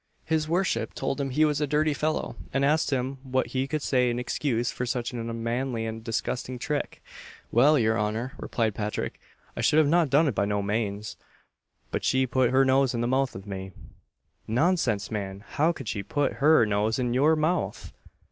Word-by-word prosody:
His 160 -1 0
worship 185 +3 0
told 135 +1 -2
him 135 - -2
he 150 +4 +3
was 150 -1 0
a 150 - +1
dirty 150 +1 +2
fellow, 155 +2 -2 0.2
and 135 0 +1
asked 155 +2 +2
him 135 0 -2
what 130 -1 0
he 130 +1 0
could 150 0 -2
say 125 -2 +2
in 120 - -1
excuse 120 -1 -1
for - - -4
such 120 -1 -2
an 120 - -4
unmanly 115 +1 -2
and 110 0 -5
disgusting 120 +2 -3
trick. 140 +4 -3 0.5
"Well, 145 +6 +5
your 110 -2 +2
honour," 110 +4 -2
replied 110 -3 -1
Patrick, 105 0 -3 0.4
"I - - -3
should 150 - +3
not 170 +4 +4
have 160 -4 +1
done 145 +4 +4
it 135 - +1
by 100 - +1
no 100 0 -1
manes, 105 0 -2 0.7
but - - -2
she 130 0 +2
put 130 -1 +2
her 135 +1 +4
nose 130 -1 +3
in 115 - -1
the 120 - 0
mouth 130 +1 +1
of 95 +1 -8
me." 95 -2 -6 0.7
"Nonsense, 120 - +1
man! 100 -2 -4
How 155 +3 +2
could 135 -8 -8
she 100 - -2
put 145 +8 -1
her 150 -4 +6
nose 105 +1 0
in 125 -2 0
your 145 +5 +4
mouth?" 160 +4 -1
130 Hz, 195 wpm, -27 LUFS, 115-145 Hz, 0.7 s, her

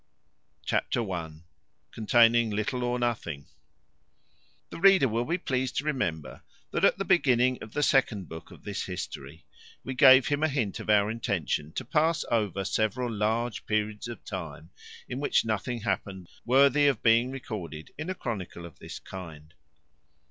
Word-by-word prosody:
Chapter 115 -3 0
i. 85 -3 -4 0.6
Containing 115 +1 +4
little 110 +4 -2
or 120 0 0
nothing. 105 -12 -3 1.3
The - - -7
reader 190 -5 +6
will 115 +1 -1
be 170 +5 0
pleased 130 -7 -2
to - - 0
remember, 85 - -3 0.3
that, - - -2
at - - +4
the 195 - -3
beginning 130 -7 +3
of 105 - -10
the 145 - 0
second 115 - +2
book 80 0 -10
of - - -15
this 100 -1 -4
history, 90 0 -7 0.4
we 130 - -4
gave 130 0 +7
him 145 0 0
a 155 - +3
hint 125 -10 -2
of - - -8
our 105 0 +4
intention 95 - -2
to - - -4
pass 160 +4 +1
over 100 -4 0
several 115 +5 -1
large 110 +2 -1
periods 105 +1 -1
of 120 -2 -9
time, 85 -3 -7 0.4
in 125 - -5
which 145 - +1
nothing 115 +2 -2
happened 95 -4 -3 0.2
worthy 140 +3 +5
of 135 -6 0
being 115 +2 +4
recorded 95 - -7
in 155 +4 -6
a 185 - -2
chronicle 95 - -5
of 85 - -13
this - - -8
kind. 80 -4 -10
115 Hz, 160 wpm, -28 LUFS, 95-130 Hz, 1.3 s, gave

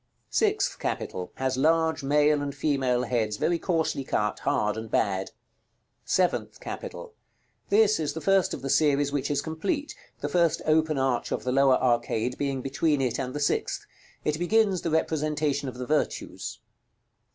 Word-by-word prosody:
SIXTH - - +1
CAPITAL. 90 -1 -3
Has 130 -1 -1
large 160 +2 +2
male 145 +1 +3
and 140 -1 -4
female 135 -4 +1
heads, 110 -4 -1
very 170 +7 +1
coarsely 160 -6 0
cut, 105 -5 -1
hard, 105 0 0
and 110 0 -6
bad. 95 -3 0
§ - - -10
LXIX. - - -30 0.7
SEVENTH 180 -2 0
CAPITAL. 470 -3 -7 0.6
This 215 -1 +4
is 155 -2 -1
the 160 - -4
first 195 +2 +2
of 130 - -10
the 135 - -3
series 145 -2 +3
which 140 -1 -1
is 145 -1 0
complete; 285 - -2 0.3
the 145 - -2
first 170 +2 +2
open 155 -1 +2
arch 130 -2 0
of - - -2
the 125 - -1
lower 135 0 +5
arcade 120 -1 0
being 135 -2 -1
between 145 +2 +1
it 130 -3 0
and 130 +1 -4
the - - -2
sixth. 145 - -1 0.4
It 150 +1 0
begins 195 0 +2
the 170 - -2
representation 150 -3 0
of 125 - -9
the 125 - -4
Virtues. 155 +3 -2
145 Hz, 170 wpm, -27 LUFS, 130-160 Hz, 0.7 s, lower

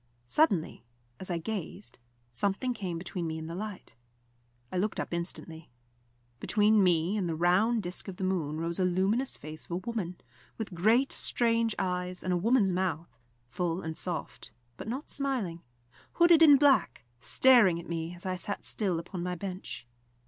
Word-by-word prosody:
Suddenly, 180 - +1 0.4
as 190 - -4
I 175 - 0
gazed, 195 -2 -6 0.3
something 200 - 0
came 185 -7 -4
between 175 0 -4
me 160 0 -3
and 160 0 -6
the 165 - -6
light. 205 - -7 0.8
I - - -2
looked 210 +3 -1
up - - -4
instantly. 170 -2 -5 0.7
Between 210 0 +3
me 175 +1 +2
and 185 -4 -1
the 165 - -1
round 195 +7 +2
disc 180 +3 -5
of 190 - -6
the 190 - -5
moon 160 -5 -1
rose 170 +2 -2
a - - +3
luminous 195 +9 +1
face 155 +1 -9
of - - -23
a 170 - -2
woman, 185 -2 -4 0.4
with 220 -4 -5
great 225 +10 +3
strange 230 -2 +2
eyes, 180 -1 -2
and 185 - 0
a - - +2
woman's 205 0 +3
mouth, 170 -8 -2 0.3
full 170 +7 -2
and 160 0 -4
soft, 175 -9 -4 0.2
but - - -8
not 260 +6 -5
smiling, 245 -12 -2 0.5
hooded 340 -1 +6
in 295 -3 +9
black, 275 - +3 0.2
staring 215 - +5
at 170 - -10
me 165 +1 -4
as 175 - -7
I 185 -1 -1
sat 205 +3 -5
still 190 -6 0
upon 175 +2 -6
my 180 0 -2
bench. 185 - -6
185 Hz, 170 wpm, -30 LUFS, 170-215 Hz, 0.8 s, in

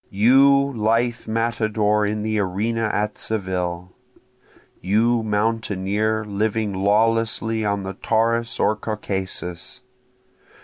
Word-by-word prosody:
You 140 +6 +4
lithe 115 +2 0
matador 110 -2 0
in 105 0 -2
the 110 0 -1
arena 110 +4 -1
at 105 +1 -2
Seville! 90 -4 -3 0.9
You 115 +4 +2
mountaineer 110 0 -1
living 105 0 -1
lawlessly 110 +3 +1
on 100 -1 -1
the 95 0 -5
Taurus 115 +3 0
or 110 - +2
Caucasus! 95 -5 -5
110 Hz, 95 wpm, -22 LUFS, 100-115 Hz, 0.9 s, You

